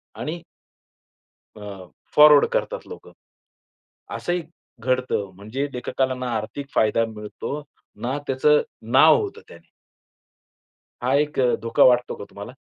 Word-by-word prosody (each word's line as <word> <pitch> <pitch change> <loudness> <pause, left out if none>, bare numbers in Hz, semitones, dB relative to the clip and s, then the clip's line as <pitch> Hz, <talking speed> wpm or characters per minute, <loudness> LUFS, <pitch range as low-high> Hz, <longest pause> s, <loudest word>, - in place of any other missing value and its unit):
आणि 170 +2 -5 1.1
अ, 100 -3 -9 0.3
फॉरवर्ड 150 -1 +8
करतात - - -2
लोकं. 455 - -11 1.0
असंही 175 0 -2 0.4
घडतं 125 -6 -1
म्हणजे 110 +9 -4
लेखकाला 130 +1 -1
ना 125 0 -5
आर्थिक 120 +6 -6
फायदा 110 +1 +3
मिळतो, 105 +7 -6 0.4
ना 130 +5 -2
त्याचं 150 +3 +3 0.3
नाव 145 +5 +7
होतं 420 +2 -6
त्याने. - - -16 1.3
हा 125 +2 0
एक 150 0 +1
अ, 125 -2 +3
धोका 115 0 +3
वाटतो 125 -1 +4
का - - -9
तुम्हाला? 100 +4 -9
130 Hz, 120 wpm, -23 LUFS, 115-150 Hz, 1.3 s, फॉरवर्ड